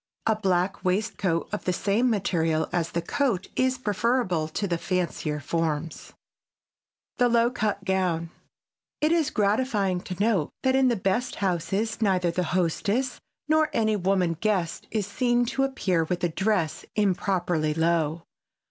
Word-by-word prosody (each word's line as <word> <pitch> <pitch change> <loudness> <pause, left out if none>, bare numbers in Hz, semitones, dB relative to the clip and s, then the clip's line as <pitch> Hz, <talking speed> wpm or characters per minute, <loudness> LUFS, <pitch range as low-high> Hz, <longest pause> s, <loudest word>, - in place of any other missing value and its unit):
A 220 - +3
black 190 -2 0
waistcoat 185 -3 0
of 210 - -3
the 185 - +2
same 210 +7 +1
material 165 -7 +1
as 170 -2 -1
the 170 - -1
coat 220 -2 -1
is 255 0 +1
preferable 210 -7 0
to 200 +5 -3
the 170 -2 -1
fancier 170 -5 -2
forms. 160 +1 -2
[Sidenote: - - -16 1.0
THE 245 -1 +4
LOW 235 0 +4
CUT 210 -5 -2
GOWN] 180 -4 0 0.7
It 305 +1 +2
is 330 -4 +2
gratifying 205 -3 +1
to 185 - -6
note 205 -7 +2
that 260 0 +3
in 265 -1 +4
the 240 - +2
best 195 +5 -1
houses 195 +4 -1
neither 185 -4 +2
the 180 +1 -1
hostess 205 +9 0 0.3
nor 310 0 +3
any 220 -1 +2
woman 185 -3 +1
guest 190 -6 -1
is 215 -3 -1
seen 240 +4 +1
to 265 +3 0
appear 190 -11 0
with 175 +2 -3
a 175 - +2
dress 190 -2 0
improperly 180 -6 +1
low. 165 -1 +1
195 Hz, 150 wpm, -26 LUFS, 170-225 Hz, 1.0 s, THE